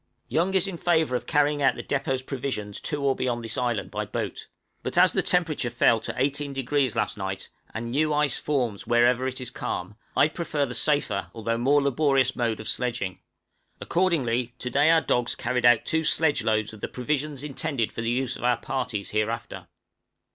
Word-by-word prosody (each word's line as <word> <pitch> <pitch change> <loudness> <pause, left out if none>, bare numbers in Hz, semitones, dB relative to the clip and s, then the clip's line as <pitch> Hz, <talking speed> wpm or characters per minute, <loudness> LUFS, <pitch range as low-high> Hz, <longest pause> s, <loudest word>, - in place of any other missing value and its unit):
Young 180 +4 +1
is 190 +1 +4
in 190 -3 -5
favor 160 -6 +2
of - - -3
carrying 145 -1 +2
out - - +4
the - - -6
depôt 135 -2 -1
provisions 120 -7 -4
to 145 -2 -2
or 135 -1 +2
beyond 120 -2 -2
this 115 - -1
island 120 -3 -1
by - - -2
boat; - - -5 0.3
but - - -4
as - - +6
the - - +2
temperature 160 -8 0
fell 115 -1 +3
to - - -5
18° 140 -1 0
last 110 -2 -1
night, 95 0 -4 0.2
and 115 +1 -5
new 155 +4 +1
ice 150 -3 +1
forms 125 -9 -1
wherever 120 +2 +3
it 130 0 -4
is 125 -1 -4
calm, 95 -4 -4 0.2
I - - +6
prefer 155 -2 -2
the 125 - -6
safer, 130 -11 +1
although 115 +1 -1
more 140 +4 +3
laborious 135 -1 +2
mode 115 -2 -1
of 110 - -7
sledging; 115 -7 -2 0.6
accordingly 125 -10 0
to 125 - -4
day 145 +5 +4
our 165 -1 +5
dogs 120 -4 0
carried 125 +1 +1
out 120 -2 +5
two 160 -1 0
sledge 160 -1 +2
loads 110 -1 0
of 105 - -12
the - - -2
provisions 145 +2 -2
intended 140 -4 -2
for - - -5
the 115 - -1
use 125 0 0
of - - -9
our 120 -1 +3
parties 125 -6 -3
hereafter. 110 +2 -2
130 Hz, 190 wpm, -26 LUFS, 115-145 Hz, 0.6 s, as